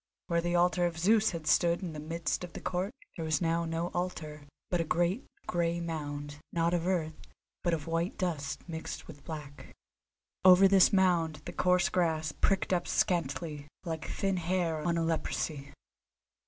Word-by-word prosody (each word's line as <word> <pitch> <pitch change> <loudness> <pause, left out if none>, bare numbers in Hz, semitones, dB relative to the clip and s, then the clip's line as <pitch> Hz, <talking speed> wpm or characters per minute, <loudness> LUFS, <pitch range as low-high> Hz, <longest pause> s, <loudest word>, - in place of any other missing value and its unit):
Where 170 -1 +1
the 175 +1 0
altar 175 0 +3
of 165 -1 -5
Zeus 215 +5 +4
had 165 -3 -5
stood 170 +4 +3
in 170 -3 -4
the 150 - -6
midst 165 +3 -2
of 180 - -7
the - - -6
court 185 +3 -2 0.2
there 165 - -4
was 155 -1 +1
now 170 0 +1
no 165 +1 -2
altar, 155 -5 -4 0.2
but 175 -2 +2
a - - +1
great, 175 - 0 0.2
grey 170 -1 0
mound, 145 -3 -4
not 170 0 +1
of 175 0 0
earth, 160 -4 -2 0.4
but 175 - +2
of 155 -2 -7
white 165 +2 -1
dust 160 -6 -3
mixed 160 -1 -6
with 145 -3 -12
black. 150 -3 -8 0.7
Over 185 +1 +8
this 190 -1 +6
mound 170 -6 +2
the - - -6
coarse 180 -1 +3
grass 160 -3 +1
pricked 190 +4 +1
up 175 -1 0
scantily, 150 -3 -1 0.2
like 160 -3 -4
thin 195 -1 0
hair 170 -2 0
on 170 +1 0
a 165 - +1
leprosy. 155 -3 -2
170 Hz, 175 wpm, -31 LUFS, 155-180 Hz, 0.7 s, Over